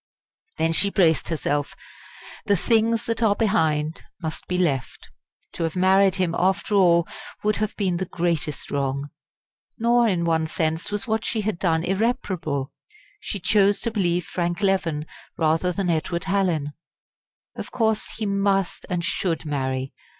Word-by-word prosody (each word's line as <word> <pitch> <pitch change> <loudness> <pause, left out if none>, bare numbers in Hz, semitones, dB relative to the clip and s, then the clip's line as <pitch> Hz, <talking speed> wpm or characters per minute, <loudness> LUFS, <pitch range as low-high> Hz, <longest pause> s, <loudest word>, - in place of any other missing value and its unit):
Then 165 0 +1
she 200 +4 +1
braced 170 -5 +2
herself. 145 -3 -1 0.7
The 205 - +4
"things 225 +3 +2
that 230 +1 -2
are 210 -3 +4
behind" 160 -8 +1 0.2
must 160 -3 -5
be 180 - -1
left. 140 -9 -1 0.5
To - - -6
have 165 0 -2
married 190 +1 +4
him 185 -3 0
after 190 +3 +1
all 170 -4 +4 0.4
would 210 0 +2
have 215 0 -2
been 185 -4 0
the 185 +1 -3
greatest 165 -4 -2
wrong. 140 0 -2 0.7
Nor, 235 +1 +3
in 175 -5 +1
one 160 -1 +1
sense, 160 0 -1
was 205 0 -2
what 220 -1 -1
she 225 -2 -1
had 210 -4 -2
done 165 -3 +1
irreparable. 190 - -1 0.5
She 210 - -4
chose 200 +2 +3
to 230 - -1
believe 175 -5 0
Frank 175 +1 -2
Leven, 170 -6 +1 0.3
rather 165 +3 +2
than 180 -1 0
Edward 170 +1 -1
Hallin. 180 -7 0 0.8
Of - - -6
course 220 -2 0
he 220 - -2
must 195 -1 0
and 175 -2 -1
should 165 -3 -1
marry! 130 -2 -2
180 Hz, 150 wpm, -24 LUFS, 160-200 Hz, 0.8 s, The